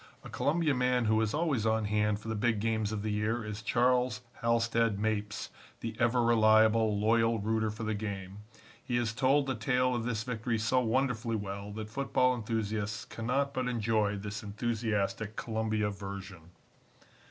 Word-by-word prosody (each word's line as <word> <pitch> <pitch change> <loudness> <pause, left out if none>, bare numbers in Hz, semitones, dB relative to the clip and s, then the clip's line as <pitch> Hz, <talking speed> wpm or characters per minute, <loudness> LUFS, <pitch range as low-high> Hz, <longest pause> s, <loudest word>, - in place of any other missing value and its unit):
A - - -9
Columbia 155 0 +1
man 125 -1 +1
who 110 0 +3
is 110 -2 0
always 150 -6 0
on 110 -1 +1
hand 105 0 +1
for 110 - -11
the 110 - -1
big 110 0 +1
games 110 -1 0
of 105 -1 -3
the 110 - -1
year 110 +2 -1
is 105 0 -5
Charles 125 +1 +2 0.2
Halstead 115 -2 +2
Mapes, 105 -1 -2 0.3
the 115 -1 -4
ever 120 +1 +3
reliable, 110 -1 +4
loyal 115 +1 +3
rooter 110 +1 0
for 110 +2 -6
the 110 0 -1
game. 100 -2 -5 0.4
He 120 - -2
has 120 -3 0
told 135 +3 +3
the 135 - -1
tale 125 +2 +1
of 120 -2 -1
this 115 -2 -2
victory 115 -1 -2
so 115 +4 +2
wonderfully 120 -1 0
well 100 0 -5
that 110 0 -6
football 130 0 +2
enthusiasts 110 -2 -2
cannot 135 +5 -1
but 130 -1 -1
enjoy 110 -3 +1
this 105 +1 -5
enthusiastic 110 -1 -2
Columbia 110 -2 -1
version. 95 -4 -8
110 Hz, 165 wpm, -31 LUFS, 105-120 Hz, 0.4 s, reliable